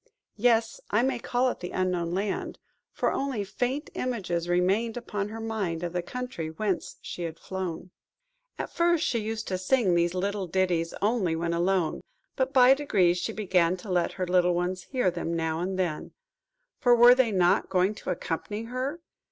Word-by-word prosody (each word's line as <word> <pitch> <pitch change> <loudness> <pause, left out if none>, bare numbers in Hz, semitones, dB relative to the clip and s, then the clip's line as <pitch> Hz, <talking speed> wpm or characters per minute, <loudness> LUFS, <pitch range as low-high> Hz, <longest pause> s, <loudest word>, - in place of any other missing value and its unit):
Yes! 225 0 +2
I 215 +3 +2
may 260 -2 0
call 250 +2 +1
it - - -5
the 180 - -5
Unknown 180 -2 -1
Land; 195 +2 -2 0.3
for - - 0
only 270 -6 -1
faint 245 - -3
images 180 -9 -2
remained 195 +7 +1
upon 210 -4 -3
her 225 +1 -7
mind 205 -7 -3
of 175 -1 -3
the 180 - 0
country 250 -6 -5
whence 190 +3 -2
she - - -6
had 165 -1 -4
flown. 185 -1 -5 0.7
At - - -4
first 340 -1 +2
she 235 - +1
used 220 +1 -4
to 185 -1 -1
sing 195 -1 +2
these 170 0 +2 0.4
ditties 175 -2 0
only 205 -6 +1
when 170 +1 -1
alone, 175 -1 +1 0.3
but 260 0 0
by 255 -1 +7
degrees 190 -11 +2
she 175 - -2
began 185 -4 +1
to 185 +2 -8
let 175 -1 +1
her 185 - -2
little 180 0 +3
ones 180 +1 -2
hear 250 -9 +1
them 170 -1 -3
now 160 -1 -1
and 185 +2 -2
then,–for 245 - -2
were 240 +1 +9
they 250 -3 +2
not 180 -3 +3
going 185 +2 +2
to 205 - -8
accompany 185 +5 -3
her? 255 +7 -4
190 Hz, 175 wpm, -27 LUFS, 175-240 Hz, 0.7 s, were